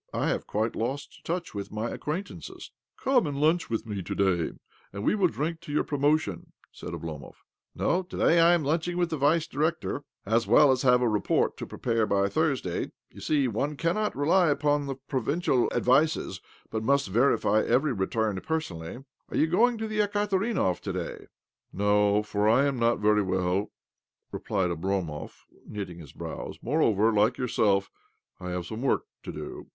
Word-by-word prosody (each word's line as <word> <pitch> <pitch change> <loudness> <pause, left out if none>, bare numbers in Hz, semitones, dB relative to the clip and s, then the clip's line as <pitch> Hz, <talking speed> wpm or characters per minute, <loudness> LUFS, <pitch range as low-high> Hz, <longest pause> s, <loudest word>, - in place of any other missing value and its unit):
I - - 0
have - - -2
quite 110 +2 -1
lost 130 +5 -4
touch 175 +2 -3
with 100 -1 -5
my 110 +2 -3
acquaintances." 180 +7 -6
" - - -62
Come 260 - +3
and 140 -1 -3
lunch 160 +3 +2
with 115 0 -2
me 105 -3 -4
to - - -5
day, 95 -4 +1 0.4
and 100 +1 -6
we - - +3
will 200 -3 +3
drink 160 +1 -3
to 150 - -9
your 150 - +2
promotion," 145 - 0 0.2
said - - -8
Oblomov. 80 -3 -7 0.2
" - - -65
No, 180 - +1
to 185 - -9
day 170 - +4
I 170 +1 +6
am 170 - -1
lunching 165 +4 -1
with 175 -1 0
the 160 - -1
Vice 150 +3 +3
Director, 155 -1 -2 0.2
as 115 +3 +1
well 150 -2 +6
as 130 -1 +1
have 125 -2 +4
a - - +3
report 105 -2 +1
to - - -6
pre - - -9
pare 115 -3 +1
by 100 0 +2
Thursday. 140 - -1 0.2
You - - -12
see, 145 -4 +2
one 140 +6 -2
cannot 205 +7 0
rely 165 +5 +3
upon 145 -1 +1 0.2
provincial 135 0 +1
advices, 145 +6 +2 0.3
but 110 - -2
must 140 0 +2
OBLOMOV - - -8
31 115 - +4
verify 110 -5 +3
every 130 +4 +2
return 105 0 -1
personally. 125 - -4 0.2
Are - - -3
you - - +4
going 225 +9 +3
to 220 0 -3
the 215 0 -3
Ekaterinbov 205 - +1
to - - -5
day? - - -5
" - - -66
" - - -55
No, 105 +1 +2
for 105 0 +1
I 130 +5 +4
am 140 -3 -1
not 115 0 +3
very 105 0 +3
well," 95 +1 0 0.6
replied 95 -3 -1
Oblomov, 85 -3 -3 0.2
knitting 95 -5 -6
his 75 -6 -11
browis. - - -7
" - - -45
Moreover, 115 -6 +2
like 110 +4 +3
yourself, 100 -6 +1 0.5
I 90 -1 -6
have 90 -1 -3
some 110 +6 -6
work 135 - +1 0.2
to - - -7
do." - - -8
125 Hz, 190 wpm, -27 LUFS, 105-160 Hz, 0.6 s, I